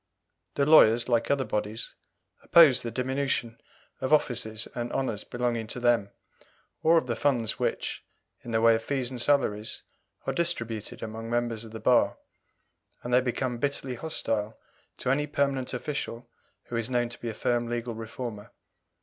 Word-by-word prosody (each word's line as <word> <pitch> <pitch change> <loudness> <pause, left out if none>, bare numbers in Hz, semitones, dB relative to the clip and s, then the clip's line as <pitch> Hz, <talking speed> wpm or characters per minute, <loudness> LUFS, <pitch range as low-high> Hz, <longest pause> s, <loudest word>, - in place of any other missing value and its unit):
The 140 - +2
lawyers, 120 -6 +6
like 120 -2 +1
other 140 -1 +2
bodies, 105 +1 -3 0.5
oppose 145 -7 +7
the 120 - -4
diminution 130 -2 -2 0.4
of 130 - -2
offices 120 -7 +1
and 120 0 -4
honours 115 -6 -2
belonging 120 -2 -2
to 125 - -5
them, 120 -5 +2 0.7
or 165 +1 +5
of 160 - +2
the 120 -2 -2
funds 120 -6 0
which, - - -2 0.4
in - - -8
the 110 -1 +1
way 115 0 +6
of 115 - 0
fees 130 +1 -2
and 125 -2 -4
salaries, 115 -7 +1 0.4
are - - -1
distributed 115 -11 -1
among 115 +1 -6
members 120 -1 -1
of 110 - -11
the 110 - -7
bar; 125 +1 +3 0.9
and 120 - -3
they 125 - +6
become 125 -1 -2
bitterly 140 -1 -1
hostile 115 -6 -2 0.4
to 125 - 0
any 145 +2 +1
permanent 140 -3 0
official 125 -2 -4 0.4
who 120 - -7
is 115 +1 -1
known 120 -1 +1
to 120 - -9
be 120 - -3
a - - -4
firm 120 -1 0
legal 120 0 -3
reformer. 115 -1 -7
120 Hz, 165 wpm, -28 LUFS, 115-130 Hz, 0.9 s, oppose